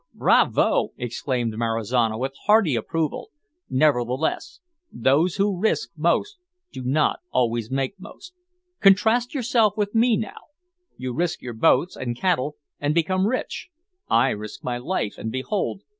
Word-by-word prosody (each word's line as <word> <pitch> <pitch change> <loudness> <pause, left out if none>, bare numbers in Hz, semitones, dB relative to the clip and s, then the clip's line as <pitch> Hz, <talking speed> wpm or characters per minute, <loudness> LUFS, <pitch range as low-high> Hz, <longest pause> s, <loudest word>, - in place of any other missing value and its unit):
"Bravo!" - - +3
exclaimed 120 -1 -2
Marizano, 115 0 0
with 135 +3 -3
hearty 210 -8 +5
approval; 155 +7 -2 0.4
"nevertheless 130 0 0 0.3
those 160 +7 +2
who 195 -2 0
risk 220 - 0
most 170 - 0 0.3
do - - -7
not 140 +5 +1
always 115 -2 0
make 135 +8 -2
most. 225 - -12 0.5
Contrast 220 +6 +4
yourself 230 -5 +2
with 205 -1 -1
me, 230 0 +3
now. 215 - -6 0.5
You 130 -1 -4
risk 170 +4 -2
your 120 - -5
boats 165 +9 +2
and 120 -2 -4
cattle, 150 -5 0 0.2
and 145 +1 0
become 185 +4 +2
rich. 255 +3 -3 0.4
I - - +4
risk 105 0 -7
my 120 -1 -2
life, 125 - -3
and 110 - -4
behold! 190 - -2
150 Hz, 135 wpm, -23 LUFS, 125-200 Hz, 0.5 s, hearty